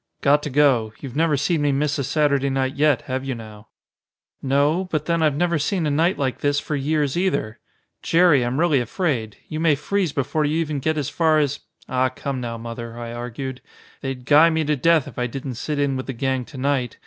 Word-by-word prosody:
"Got 145 +1 +4
to 150 - -4
go. 130 -6 +3
You've 135 -4 -8
never 155 -1 +2
seen 155 +3 0
me 145 -1 +2
miss 145 +2 0
a - - 0
Saturday 140 -1 +1
night 135 0 0
yet, 145 -2 +2
have 130 0 -3
you 135 -2 -3
now?" 110 -2 -11 0.7
"No. 145 +7 +2
But 155 -3 -1
then 170 0 0
I've 155 -3 +2
never 170 +1 +1
seen 165 +3 0
a 150 - 0
night 165 +6 +2
like 135 -3 -2
this 145 0 +1
for 150 - -3
years 145 0 0
either. 175 - -1 0.4
Jerry, 165 -5 +4
I'm 120 +4 -1
really 160 -5 +3
afraid. 120 - -2
You 155 - -4
may 160 -2 +3
freeze 180 +4 -1
before 145 +2 -1
you 150 +2 0
even 155 -3 -1
get 155 +3 -1
as 145 -4 -1
far 160 -2 +2
as 145 -2 0 0.2
" - - -52
"Ah, 130 0 +1
come 130 0 -5
now, 115 -1 -4
Mother," 115 0 -7
I 120 -1 -6
argued. 125 +2 -6 0.4
"They'd 135 -2 -5
guy 150 +4 +6
me 160 -1 0
to 150 0 +1
death 160 +1 +3
if - - -8
I 125 - 0
didn't 135 +2 -5
sit 145 +6 -4
in 140 -1 +1
with 130 - -5
the 135 - -3
gang 130 +1 -1
to 135 - -12
night. 130 -2 -1
140 Hz, 225 wpm, -22 LUFS, 130-155 Hz, 0.7 s, guy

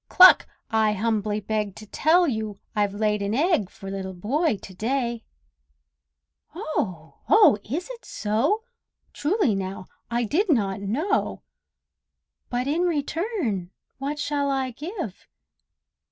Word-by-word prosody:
cluck! 370 0 +8 0.2
I 220 -1 +3
humbly 210 0 0
beg 210 -1 -2
To 215 - -10
tell 335 - +3
you 220 -5 -1
all 200 - -12 0.2
I've 205 -1 +1
laid 210 0 +1
an 200 +2 -1
egg 300 - +2
For 195 0 -9
Little 190 -1 -5
Boy 255 - 0
to 190 - -11
day!" 235 +2 -1 1.3
Oh! 185 - -3
oh! 400 - +7
is 315 +11 -3
it - - -9
so? 245 - 0 0.5
Truly 315 - +1
now, 190 -1 -4 0.2
I 240 0 0
did 355 - +1
not 200 - +1
know! 285 - -1 1.1
But 245 +1 -1
in 300 +5 +1
return 315 - -1 0.3
what 285 +2 -3
shall 290 -1 0
I 265 -2 0
give? 305 - -6
235 Hz, 130 wpm, -25 LUFS, 205-315 Hz, 1.3 s, cluck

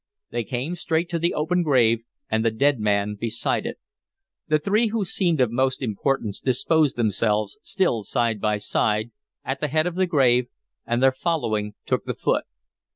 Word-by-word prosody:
They 120 0 -1
came 130 +8 -3
straight 170 0 -1
to 170 -1 -1
the 170 +2 0
open 180 +4 +1
grave, 120 -8 +3 0.3
and 110 0 0
the 115 - +3
dead 135 +4 +2
man 105 -1 +1
beside 115 +2 -2
it. - - -5 0.7
The 155 -1 +3
three 205 +9 +2
who 215 -2 -1
seemed 175 -4 0
of 125 -3 +3
most 130 +2 +1
importance 110 -1 -1
disposed 145 +3 +2
themselves, 105 -2 0
still 190 - 0
side 115 -1 0
by 105 -1 +1
side, 105 +2 0 0.3
at 135 0 -2
the 150 - +1
head 155 +3 +2
of 180 - -1
the 185 +1 +1
grave, 125 -6 +3 0.4
and 120 +2 +1
their 135 - +6
following 110 -9 -1
took - - -1
the - - -3
foot. - - 0
130 Hz, 175 wpm, -24 LUFS, 110-160 Hz, 0.7 s, their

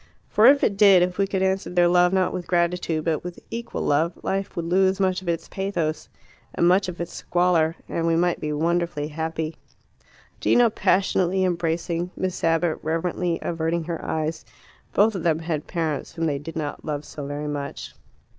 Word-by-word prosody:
For 215 +3 +5
if 280 +1 +6
it 200 - +2
did, 195 -3 +7
if 180 +1 -2
we 195 - +3
could 190 -1 -1
answer 190 0 0
their 175 -1 +3
love 180 0 +4
not 190 -1 +1
with 175 -1 -5
gratitude 170 -2 0
but 160 -2 0
with 180 0 -7
equal 235 +1 -4
love, 160 +4 +2
life 195 0 -2
would 170 - -3
lose 190 +2 +2
much 185 -1 +1
of 180 - -5
its 165 -1 -2
pathos 180 -5 -3 0.5
and 170 - +3
much 185 +1 +3
of 175 - -8
its 170 - -5
squalor, 175 -2 +1
and 165 0 -1
we 165 - +3
might 175 +1 +1
be 150 - -3
wonderfully 165 -1 -1
happy. 160 0 -4 0.8
Gino 240 -2 +4
passionately 190 -2 +2
embracing, 170 0 -1
Miss 185 -1 -3
Abbott 165 0 +1
reverently 165 +2 -1
averting 165 0 -1
her 165 0 -5
eyes 160 0 -2 0.5
both 215 +2 +3
of 190 - -4
them 160 -1 +2
had 160 -2 -3
parents 160 -5 -3
whom 165 - -2
they 145 -3 0
did 160 +3 -8
not 150 -2 -4
love 150 -1 -4
so 145 -2 -7
very 145 +1 -4
much. 145 -1 -5
170 Hz, 185 wpm, -24 LUFS, 160-185 Hz, 0.8 s, did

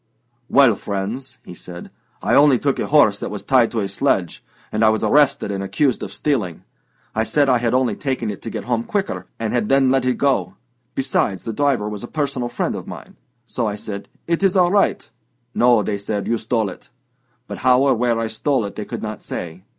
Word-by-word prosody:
"Well, 135 -6 +5
friends," 110 +7 -4
he - - -9
said, 90 0 -10 0.3
"I - - +1
only 140 -2 +6
took 140 +2 -1
a - - -1
horse 110 -9 +4
that - - -4
was 105 - -6
tied 125 -4 +4
to 115 - -2
a 100 - -1
sledge, 95 -2 -1 0.3
and 110 +1 0
I 110 - +6
was 110 -1 0
arrested 145 -7 +3
and 100 0 -3
accused 130 +6 0
of 95 - -5
stealing. 105 - -2 0.5
I 110 - +1
said 145 +5 +2
I 125 -2 +4
had 120 +1 0
only 125 -5 +1
taken 130 -6 -2
it 100 - -9
to 115 - -6
get - - -5
home 120 -2 -1
quicker, 200 - -3
and 115 -1 -2
had 120 -4 0
then 135 -1 +4
let 135 -1 +2
it 125 -1 +1
go; 140 -2 +1 0.4
besides, 130 -7 0
the 115 - -4
driver 135 -4 +1
was 105 0 -5
a - - -5
personal 140 -5 -2
friend - - -2
of - - -7
mine. - - -10 0.3
So 120 -1 -2
I 105 - -2
said, 100 -1 -7 0.2
'It's 185 +3 +1
all 180 -2 +4
right.' 200 0 +2 0.5
'No,' 120 -5 +4
said 100 0 -3
they, - - -2
'you 115 - +1
stole 110 -3 -1
it.' - - -14 0.6
But - - -7
how 130 +1 +4
or 140 - +4
where 120 0 +1
I 115 - 0
stole 115 +2 0
it 100 - -7
they 105 - -5
could - - -6
not 110 -1 -5
say. 90 +2 -7
120 Hz, 220 wpm, -20 LUFS, 105-135 Hz, 0.6 s, only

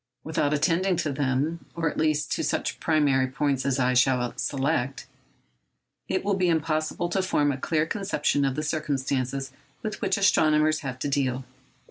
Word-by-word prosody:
Without 155 -2 0
attending 170 +5 +2
to 160 -3 -1
them—or 145 +5 -1
at - - -2
least 155 -1 +1
to - - 0
such - - -1
primary 145 -4 +2
points 135 0 -1
as 135 -1 +1
I 130 -1 +2
shall 125 -1 +2
select—it 135 - -5
would 200 -1 +1
be 180 -1 +3
impossible 160 +1 0
to 190 +2 +1
form 150 -6 +1
a 135 - -3
clear 155 +2 +1
conception 165 -6 0
of 135 -1 0
the 150 - -2
circumstances 135 -3 -2 0.3
with 215 -1 -4
which 190 -1 +1
astronomers 155 -5 +3
have 135 -4 -5
to 130 - -3
deal. 130 -2 -1
150 Hz, 155 wpm, -26 LUFS, 135-160 Hz, 0.3 s, be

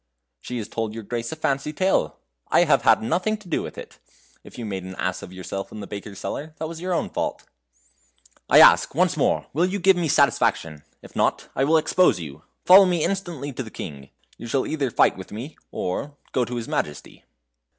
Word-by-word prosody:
"She 125 - -6
has 110 -3 -4
told 110 -1 -4
your 115 - -6
grace 115 +2 -4
a - - -4
fancy 150 -2 -1
tale 170 - 0 0.3
I - - +4
have - - +3
had - - +4
nothing 200 - 0
to 210 -3 -17
do 165 - -1
with - - -8
it; - - -10 0.4
if - - -14
you 120 - -5
made 95 -3 -4
an 95 0 -8
ass 95 0 -2
of - - -10
yourself 95 +1 -6
in 110 - -8
the 100 - -6
baker's 100 0 -8
cellar, 155 +2 -6
that 160 - -4
was 165 +1 -8
your 180 0 -1
own - - -2
fault." - - -3 1.1
"I - - +8
ask, - - +6
once - - +2
more, - - +1
will 170 +6 +2
you 195 +2 -2
give 190 0 +4
me 170 -2 0
satisfaction? 80 - +2 0.2
If - - -14
not, - - 0
I 135 - +2
will 160 +3 +4
expose 160 - +3
you. 75 -3 -8 0.2
Follow 190 +2 +9
me 175 -3 +1
instantly 170 -8 -3
to 130 - -5
the 115 - -7
King. 70 -9 -8 0.3
You 120 - -7
shall 130 +3 0
either 145 -4 -1
fight 110 - +3
with 95 - -10
me, 120 +9 -7
or 140 +11 -4
go 125 - +1
to 125 - -6
his 115 -1 -4
Majesty." 75 -1 -4
130 Hz, 215 wpm, -23 LUFS, 100-160 Hz, 1.1 s, Follow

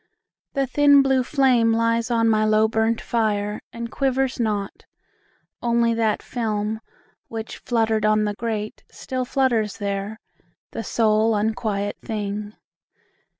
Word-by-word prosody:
the 275 -1 +1
thin 285 +1 +5
blue 265 -1 +3
flame 255 -4 +3
Lies 230 +1 +1
on 230 -1 +2
my 215 -1 +3
low 215 0 +4
burnt 225 +1 +1
fire, 210 -2 -1
and 235 -1 -6
quivers 265 -1 0
not; 210 -4 -2 0.8
Only 235 -1 +2
that 225 -2 0
film, 220 -2 -2 0.5
which 225 -1 -6
fluttered 225 -2 0
on 215 0 +3
the 210 0 -1
grate, 215 -1 -4
Still 255 -1 -4
flutters 240 -6 +1
there, 200 +1 -3 0.5
the 225 - -5
sole 220 0 +2
unquiet 205 -1 -1
thing. 210 -1 -4
225 Hz, 125 wpm, -23 LUFS, 215-235 Hz, 0.8 s, thin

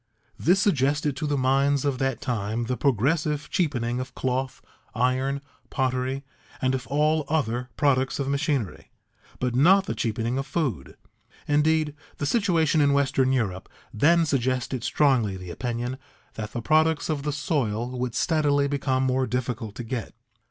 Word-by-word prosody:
This 180 +5 +3
suggested 145 -5 +1
to 150 - -2
the 145 -1 0
minds 135 +2 +2
of 135 -3 0
that 135 0 -1
time 115 -2 -2
the 125 +2 -2
progressive 145 +4 0
cheapening 125 -8 0
of 130 0 -6
cloth, 130 0 -2 0.4
iron, 130 +3 0 0.3
pottery, 130 +1 -1 0.3
and 130 0 +1
of 130 -3 -3
all 150 +4 +2
other 125 -5 -1
products 135 -2 +2
of 140 - -2
machinery, 140 - -1 0.5
but 125 -1 -1
not 185 +10 +5
the - - -2
cheapening 115 +3 -1
of 135 - -4
food. 135 - -3 0.5
Indeed, 150 +1 +2 0.2
the 145 - -2
situation 165 -6 +2
in 140 -1 +4
western 135 -2 +2
Europe 105 -8 -1 0.2
then 165 +9 +4
suggested 130 -3 -1
strongly 120 -11 +2
the 90 -1 -8
opinion 120 +5 -3 0.3
that 105 -1 -6
the 120 - -4
products 155 +2 +3
of 155 -3 -1
the 150 +1 -2
soil 125 -6 -1
would 125 -2 -2
steadily 145 -4 +2
become 135 -2 0
more 130 0 +1
difficult 120 -3 -3
to 120 - -5
get. 115 -1 -5
135 Hz, 150 wpm, -25 LUFS, 125-150 Hz, 0.5 s, not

